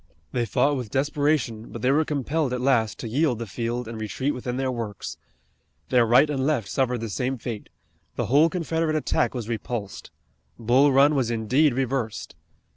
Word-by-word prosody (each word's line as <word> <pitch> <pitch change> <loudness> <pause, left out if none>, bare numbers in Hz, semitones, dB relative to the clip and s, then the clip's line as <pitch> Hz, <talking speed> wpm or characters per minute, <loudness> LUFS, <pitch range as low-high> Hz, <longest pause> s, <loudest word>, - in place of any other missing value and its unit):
They 120 -2 -1
fought 140 +7 +2
with 125 -4 -5
desperation, 140 -4 0
but 115 - -7
they 130 - +4
were 155 +3 +3
compelled 150 -1 -1
at 125 - -1
last 120 -5 +2
to - - -6
yield 130 +2 +1
the 115 - -4
field 115 +4 -3
and 110 -1 -6
retreat 130 +7 -2
within 125 0 -4
their 130 -1 0
works. 115 -5 -5 0.7
Their 125 -3 +4
right 125 +6 +6
and 140 -3 -2
left 135 -8 0
suffered 125 -3 0
the 115 - -3
same 125 +5 -2
fate. 115 -2 -6 0.5
The - - -1
whole 145 +8 +4
Confederate 165 -2 -1
attack 155 - 0
was 120 -4 -4
repulsed. 115 -3 -5 0.5
Bull 125 +5 +4
Run 140 +3 +5
was 130 -5 +1
indeed 120 +5 +2
reversed. 130 -4 -2
125 Hz, 180 wpm, -25 LUFS, 115-140 Hz, 0.7 s, right